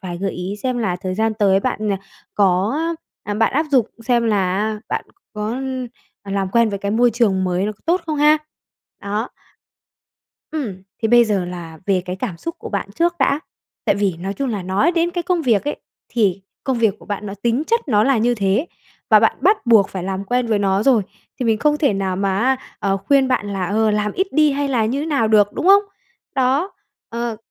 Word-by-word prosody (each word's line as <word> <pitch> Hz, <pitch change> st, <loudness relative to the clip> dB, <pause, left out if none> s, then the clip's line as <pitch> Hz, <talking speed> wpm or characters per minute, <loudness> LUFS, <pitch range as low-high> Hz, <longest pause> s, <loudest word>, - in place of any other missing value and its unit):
vài 175 Hz, -2 st, -6 dB
gợi 195 Hz, 0 st, -2 dB
ý 180 Hz, +3 st, -4 dB
xem 255 Hz, -2 st, -1 dB
là 185 Hz, -6 st, -1 dB
thời 185 Hz, 0 st, -4 dB
gian 220 Hz, +1 st, 0 dB
tới 195 Hz, -2 st, +3 dB
bạn, 215 Hz, -3 st, -2 dB
ờ, 195 Hz, -, +1 dB, 0.4 s
có, 195 Hz, +2 st, +2 dB, 0.5 s
ơ 210 Hz, -, -6 dB
à, -, -, -2 dB
bạn 225 Hz, +1 st, +2 dB
áp 310 Hz, +3 st, +1 dB
dục 245 Hz, -5 st, +3 dB, 0.2 s
xem 240 Hz, -2 st, +2 dB
là 190 Hz, -4 st, +1 dB
á 215 Hz, 0 st, -2 dB
bạn -, -, -2 dB, 0.3 s
có, 210 Hz, 0 st, -3 dB
ưm, 260 Hz, 0 st, -3 dB, 0.4 s
ờ, 200 Hz, -, -9 dB
làm 195 Hz, -1 st, 0 dB
quen 235 Hz, -1 st, +4 dB
với 200 Hz, -1 st, -3 dB
cái 200 Hz, 0 st, -3 dB
môi 240 Hz, +2 st, +3 dB
trường 205 Hz, -5 st, +1 dB
mới 180 Hz, +1 st, 0 dB
nó 215 Hz, -, -2 dB
có 200 Hz, -, -25 dB
tốt 355 Hz, +3 st, +2 dB
không 310 Hz, -1 st, -2 dB
ha! 300 Hz, +1 st, +5 dB, 0.6 s
Đó. 210 Hz, +4 st, -2 dB, 1.2 s
Ừm, 225 Hz, -12 st, -4 dB, 0.2 s
thế 220 Hz, -, +2 dB
bây 240 Hz, 0 st, +6 dB
giờ 200 Hz, -4 st, 0 dB
là 170 Hz, -3 st, -8 dB
về 190 Hz, -2 st, +2 dB
cái 180 Hz, 0 st, -4 dB
cảm 190 Hz, -5 st, -4 dB
xúc 335 Hz, -, -5 dB
của -, -, -7 dB
bạn 200 Hz, -1 st, -3 dB
trước 345 Hz, +4 st, +1 dB
đã. 285 Hz, -, +2 dB, 0.4 s
Tại -, -, +3 dB
vì 195 Hz, -4 st, 0 dB
nói 195 Hz, +3 st, -4 dB
chung 275 Hz, -2 st, -2 dB
là 205 Hz, -4 st, -3 dB
nói 200 Hz, -, +1 dB
đến 340 Hz, 0 st, +1 dB
cái 350 Hz, -1 st, -2 dB
công 350 Hz, -1 st, 0 dB
việc 225 Hz, -5 st, +2 dB
ấy, -, -, -2 dB, 0.3 s
thì 195 Hz, -5 st, +1 dB, 0.2 s
công 260 Hz, -3 st, 0 dB
việc 220 Hz, -4 st, +2 dB
của -, -, -16 dB
bạn 205 Hz, 0 st, -4 dB
nó 195 Hz, -, -5 dB
tính 240 Hz, +4 st, +1 dB
chất 465 Hz, 0 st, +2 dB
nó 210 Hz, -3 st, +4 dB
là 270 Hz, -4 st, +3 dB
như 240 Hz, +2 st, +2 dB
thế, 205 Hz, -, +1 dB, 0.4 s
và -, -, +7 dB
bạn -, -, +3 dB
bắt 415 Hz, -, +2 dB
buộc 220 Hz, -4 st, +5 dB
phải 185 Hz, -2 st, -5 dB
làm 190 Hz, +1 st, -3 dB
quen 245 Hz, +3 st, 0 dB
với 215 Hz, -2 st, +1 dB
nó 195 Hz, 0 st, +1 dB
rồi, 240 Hz, -4 st, +4 dB, 0.4 s
thì -, -, 0 dB
mình 220 Hz, -1 st, +2 dB
không 300 Hz, +2 st, +2 dB
thể 285 Hz, -6 st, +2 dB
nào 190 Hz, -2 st, -1 dB
mà 195 Hz, 0 st, 0 dB
á, 260 Hz, +4 st, +2 dB, 0.2 s
ờ, 195 Hz, -1 st, 0 dB
khuyên 265 Hz, +7 st, +2 dB
bạn 230 Hz, -5 st, 0 dB
là, 185 Hz, -2 st, -2 dB
ờ, 215 Hz, +1 st, +2 dB
làm 210 Hz, 0 st, 0 dB
ít 380 Hz, +1 st, 0 dB
đi 305 Hz, -2 st, +4 dB
hay 285 Hz, 0 st, -1 dB
là 235 Hz, -5 st, +1 dB
như 255 Hz, +6 st, -1 dB
thế 300 Hz, -, -3 dB
nào 275 Hz, -9 st, +1 dB
được, 205 Hz, -1 st, +4 dB
đúng 355 Hz, -, -3 dB
không? 400 Hz, +1 st, +7 dB, 0.5 s
Đó, 270 Hz, +8 st, +1 dB, 0.4 s
ờ, 235 Hz, -1 st, -3 dB
220 Hz, 235 wpm, -20 LUFS, 195-260 Hz, 1.2 s, và